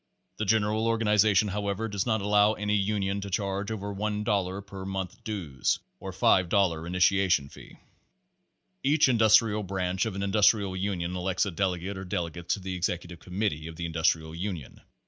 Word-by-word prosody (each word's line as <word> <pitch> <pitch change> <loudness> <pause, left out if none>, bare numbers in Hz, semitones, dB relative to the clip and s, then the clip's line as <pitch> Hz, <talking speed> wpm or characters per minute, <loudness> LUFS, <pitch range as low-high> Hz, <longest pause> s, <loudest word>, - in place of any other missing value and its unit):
The 110 - -2
general 110 +1 +1
organization, 105 -2 +3
however, 100 +2 -2
does 100 0 -2
not 110 -3 +1
allow 105 +1 +4
any 105 -1 -2
union 100 -1 0
to 100 - -6
charge 100 +1 -2
over 100 -2 -4
50 105 +1 -2
cents 100 -1 -1
per 95 0 -8
month 95 -1 -5
dues 85 -12 -1 0.2
or 95 - -6
$2.00 90 -2 +2
initiation 90 -4 +2
fee. - - -14 1.0
Each 150 +2 +4
Industrial 110 -3 +4
Branch 95 -1 -1
of 105 - -5
an 100 - -3
Industrial 100 -1 +3
Union 90 -2 -2
elects 90 +2 0
a 100 - -3
delegate 95 +1 -2
or - - -6
delegates 85 -1 -2
to - - -9
the 95 0 -5
Executive 90 -1 -3
Committee 90 -5 -3
of 80 - -8
the 85 +1 -4
Industrial 80 -1 0
Union. 85 -5 -6
95 Hz, 165 wpm, -28 LUFS, 90-105 Hz, 1.0 s, allow